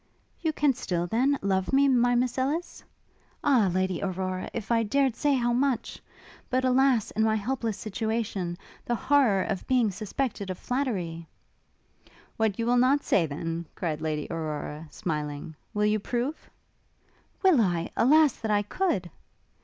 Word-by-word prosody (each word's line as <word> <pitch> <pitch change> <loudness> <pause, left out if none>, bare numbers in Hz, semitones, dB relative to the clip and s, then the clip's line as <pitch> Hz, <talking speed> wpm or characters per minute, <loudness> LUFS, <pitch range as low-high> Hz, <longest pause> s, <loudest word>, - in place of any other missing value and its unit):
'You 325 -2 +1
can 295 -2 +2
still, 175 -8 -2
then, 255 +9 +2
love 190 -1 0
me, 275 +1 +4
my 245 -2 +3
Miss 250 +1 0
Ellis?' 300 +7 -2 0.6
'Ah, 250 -9 +4
Lady 185 -1 0
Aurora! 185 -1 -3
if 230 -1 -5
I 230 -1 +4
dared 265 +2 +1
say 290 -2 +2
how 240 -2 +1
much! 260 0 -1 0.5
but, 260 0 +1
alas, 255 -3 +3
in 220 - -1
my 220 0 +3
helpless 225 -1 -2
situation, 210 -4 -3 0.3
the 240 - -1
horror 250 -7 +3
of 190 - -4
being 245 -5 +3
suspected 210 +1 -3
of 185 - -4
flattery 185 -12 -3 0.5
' - - -30
'What 220 -3 +1
you 230 - -1
will 245 +1 +3
not 265 +4 +3
say, 170 -5 +2
then,' 165 +3 -4
cried 155 -3 -3
Lady 155 -2 -2
Aurora, 155 -1 -4
smiling, 150 -2 -4 0.2
'will 210 0 0
you 210 0 +2
prove?' 245 +8 -3 0.9
'Will 360 -10 +6
I? 175 -4 0
Alas, 300 +2 +5
that 220 - -4
I 205 -1 +2
could!' 210 - -1
220 Hz, 155 wpm, -27 LUFS, 185-260 Hz, 0.9 s, Will